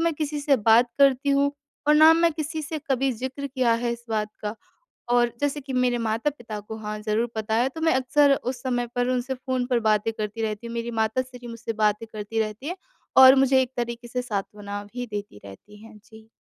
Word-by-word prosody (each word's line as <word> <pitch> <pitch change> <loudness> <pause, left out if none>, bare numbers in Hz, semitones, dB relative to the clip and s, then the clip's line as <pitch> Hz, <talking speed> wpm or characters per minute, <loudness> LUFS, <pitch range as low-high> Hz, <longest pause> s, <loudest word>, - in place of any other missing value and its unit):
मैं 335 0 +2
किसी 295 -1 -3
से 285 -1 +3
बात 225 +2 +4
करती 275 0 +4
हूँ 280 +1 +2 0.4
और 300 - +6
ना 315 +1 +8
मैं 335 0 +3
किसी 310 0 -4
से 310 +1 -4
कभी 265 0 +2
ज़िक्र 260 +4 -5
किया 255 -3 +1
है 235 - +1
इस 235 0 -9
बात 215 -1 -1
का। 210 +1 -3 0.6
और 240 -1 +3
जैसे 290 0 -1
कि 270 0 -7
मेरे 250 -1 +1
माता-पिता 230 0 -2
को 220 +2 -8
हाँ 215 0 -5
ज़रूर 215 +2 0
पता 220 0 -2
है। 245 +3 +2
तो 320 +4 -9
मैं 320 0 +3
अक्सर 275 +2 +3
उस 250 -2 -5
समय 245 -2 -1
पर 245 0 +1
उनसे 255 +1 -1
फ़ोन 255 -1 -2
पर 240 -2 +2
बातें 215 0 +1
करती 215 +1 -4
रहती 215 +1 -3
हूँ। 235 - -6
मेरी 235 0 -3
माता 220 +4 +1
श्री 250 -1 -12
मुझसे 230 0 -5
बातें 215 0 0
करती 215 +1 -3
रहती 215 +5 -4
हैं, 360 - -4 0.4
और 260 0 +10
मुझे 265 -1 +4
एक 255 - -5
तरीके 240 0 -4
से 250 +1 -2
सांत्वना 205 -2 -5
भी 245 0 -4
देती 205 - -7
रहती 205 - -13
हैं। 225 -1 -14
जी। 220 0 -16
240 Hz, 220 wpm, -25 LUFS, 220-270 Hz, 0.6 s, और